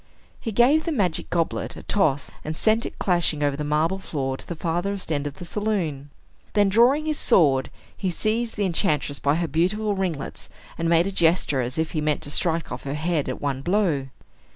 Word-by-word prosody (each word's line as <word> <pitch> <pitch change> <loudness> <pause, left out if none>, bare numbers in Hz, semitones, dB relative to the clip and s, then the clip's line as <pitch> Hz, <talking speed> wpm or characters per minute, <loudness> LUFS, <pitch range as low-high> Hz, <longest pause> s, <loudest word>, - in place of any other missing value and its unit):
He 225 - -4
gave 255 +9 +4
the 335 - -1
magic 190 - 0
goblet 170 -2 -1
a - - -10
toss, 150 -9 +1
and 155 +1 -4
sent 220 +2 +2
it - - -11
clashing 170 -5 +1
over 145 -1 +1
the 150 - -4
marble 155 +5 +1
floor 135 -7 -3
to - - -13
the 170 - -4
farthest 175 +3 -2
end 145 -1 -1
of 145 - -7
the 175 - -9
saloon. 170 -9 -2 0.4
Then, 205 -1 +4
drawing 245 +9 +4
his 310 -1 -1
sword, 135 -6 +3 0.3
he 190 - -2
seized 225 +6 -1
the 205 - 0
enchantress 155 -5 0
by 145 +1 +2
her 170 0 0
beautiful 190 +8 0
ringlets, 175 -8 -4 0.3
and 165 0 -1
made 170 0 +4
a 195 - -2
gesture 165 -6 +2
as 125 +3 -3
if 160 0 -1
he 155 - -1
meant 150 0 0
to 145 - -5
strike 165 +1 +1
off - - -5
her 140 +1 -3
head 155 -1 -1
at - - -4
one 140 -2 -2
blow. 170 -6 +1
170 Hz, 205 wpm, -24 LUFS, 150-200 Hz, 0.4 s, gave